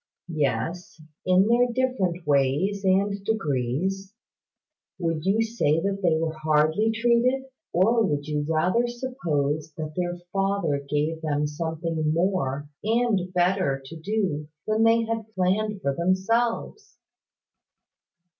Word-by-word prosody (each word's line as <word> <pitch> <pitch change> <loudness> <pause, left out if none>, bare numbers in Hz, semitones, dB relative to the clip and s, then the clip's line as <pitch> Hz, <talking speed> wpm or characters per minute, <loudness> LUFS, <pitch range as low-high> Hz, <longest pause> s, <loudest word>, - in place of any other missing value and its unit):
"Yes, 155 +5 -2 0.3
in 185 +2 +5
their 240 +2 +4
different 230 -9 -1
ways 145 +8 +1
and 195 +1 +1
degrees. 190 - -1 0.8
Would 165 -3 -2
you 215 +3 +3
say 220 -9 +1
that 195 +3 -1
they 170 -4 +3
were 160 0 -1
hardly 155 +7 +2
treated? 240 +3 +2 0.3
Or 225 +6 +3
would 145 -6 -1
you 150 -1 -1
rather 180 +10 +2
suppose 165 - -2
that 155 0 -6
their 175 -1 -2 0.2
Father 195 -7 0
gave 155 +2 -1
them 150 -2 0
something 160 0 -2
more 165 -6 0 0.2
and 220 -5 +1
better 180 -6 +1
to 160 - -9
do 165 -4 -2 0.2
than 215 +1 +1
they 230 0 +4
had 225 -1 -4
planned 195 +2 0
for 140 - +1
themselves?" 230 - -1
185 Hz, 120 wpm, -25 LUFS, 155-215 Hz, 0.8 s, in